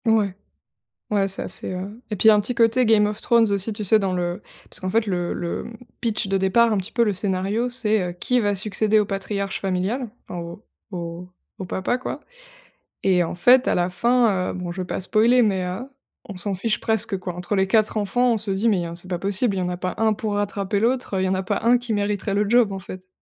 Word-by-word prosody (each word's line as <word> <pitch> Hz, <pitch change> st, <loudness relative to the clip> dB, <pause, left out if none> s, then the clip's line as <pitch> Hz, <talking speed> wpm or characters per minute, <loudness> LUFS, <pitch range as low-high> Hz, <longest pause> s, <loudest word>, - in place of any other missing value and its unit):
Ouais, 210 Hz, -4 st, +2 dB, 0.8 s
ouais, 200 Hz, -2 st, +2 dB
ça 190 Hz, -, +1 dB
c'est, -, -, -1 dB
heu 195 Hz, +6 st, -7 dB
et 210 Hz, -, -2 dB
puis, 220 Hz, -, +4 dB
un 210 Hz, -, +5 dB
petit 220 Hz, +5 st, -3 dB
côté 230 Hz, +2 st, +3 dB
Game 215 Hz, -2 st, +4 dB
of 210 Hz, 0 st, -4 dB
Thrones 230 Hz, -2 st, +3 dB
aussi, 200 Hz, +2 st, -1 dB
tu 210 Hz, 0 st, -5 dB
sais, 215 Hz, +3 st, +4 dB
dans 195 Hz, -3 st, -1 dB
le 175 Hz, -1 st, -2 dB, 0.3 s
parce -, -, -10 dB
qu'en 185 Hz, -, -3 dB
fait, 220 Hz, +2 st, +1 dB
le 175 Hz, -3 st, -1 dB
le, 170 Hz, -, -4 dB
mmh, 230 Hz, -, -9 dB, 0.3 s
pitch 225 Hz, -2 st, 0 dB
de 195 Hz, -, +1 dB
départ, 205 Hz, +5 st, +3 dB
un -, -, 0 dB
petit 190 Hz, +2 st, -4 dB
peu 235 Hz, -, +3 dB
le 210 Hz, -3 st, 0 dB
scénario, 200 Hz, +5 st, -1 dB
c'est, 220 Hz, -5 st, +1 dB
heu, -, -, -4 dB
qui 245 Hz, +8 st, 0 dB
va 205 Hz, -2 st, +1 dB
succéder 210 Hz, +2 st, +1 dB
au 210 Hz, -, 0 dB
patriarche 195 Hz, 0 st, -3 dB
familial, 195 Hz, +6 st, -1 dB, 0.2 s
en 175 Hz, -, -6 dB
au 170 Hz, +6 st, -9 dB, 0.3 s
au 175 Hz, -1 st, -6 dB, 0.3 s
au 190 Hz, -, -5 dB
papa, 190 Hz, +6 st, -1 dB
quoi 255 Hz, -, -5 dB, 0.8 s
et 185 Hz, -2 st, +3 dB
en 165 Hz, -, -4 dB
fait, 250 Hz, +8 st, +5 dB
à -, -, +2 dB
la 175 Hz, 0 st, +1 dB
fin, 220 Hz, -1 st, +2 dB
heu, -, -, -4 dB
bon, 180 Hz, -1 st, -5 dB
je 185 Hz, +2 st, -4 dB
vais -, -, -7 dB
pas -, -, -3 dB
spoiler 225 Hz, +6 st, +3 dB
mais, 195 Hz, -5 st, +2 dB
heu, 185 Hz, +9 st, -5 dB, 0.4 s
on 200 Hz, -, -7 dB
s'en 195 Hz, +2 st, -1 dB
fiche 210 Hz, +4 st, -1 dB
presque, 220 Hz, -2 st, 0 dB
quoi. 185 Hz, -1 st, -6 dB
Entre 180 Hz, +4 st, -3 dB
les 190 Hz, 0 st, +2 dB
4 215 Hz, +2 st, +2 dB
enfants, 245 Hz, +4 st, +2 dB
on -, -, 0 dB
se 210 Hz, -1 st, -4 dB
dit 195 Hz, +4 st, +1 dB
mais, 190 Hz, -6 st, +1 dB
hein, 170 Hz, 0 st, -6 dB
c'est 175 Hz, +2 st, -7 dB
pas 180 Hz, -2 st, -2 dB
possible, 200 Hz, +3 st, 0 dB
il -, -, -1 dB
y -, -, -1 dB
en 180 Hz, -, -1 dB
a 180 Hz, -, -3 dB
pas 185 Hz, 0 st, -3 dB
un 220 Hz, -1 st, +2 dB
pour 215 Hz, -1 st, -3 dB
rattraper 200 Hz, 0 st, -1 dB
l'autre, 235 Hz, -2 st, 0 dB
il -, -, +1 dB
y -, -, +1 dB
en 190 Hz, -, +1 dB
a 190 Hz, -, -1 dB
pas 185 Hz, -, -2 dB
un 240 Hz, +2 st, +4 dB
qui 240 Hz, -2 st, -3 dB
mériterait 205 Hz, 0 st, -1 dB
le 205 Hz, +1 st, +1 dB
job, 240 Hz, -3 st, +4 dB
en 195 Hz, -, -4 dB
fait. 185 Hz, 0 st, -10 dB
200 Hz, 255 wpm, -23 LUFS, 185-225 Hz, 0.8 s, un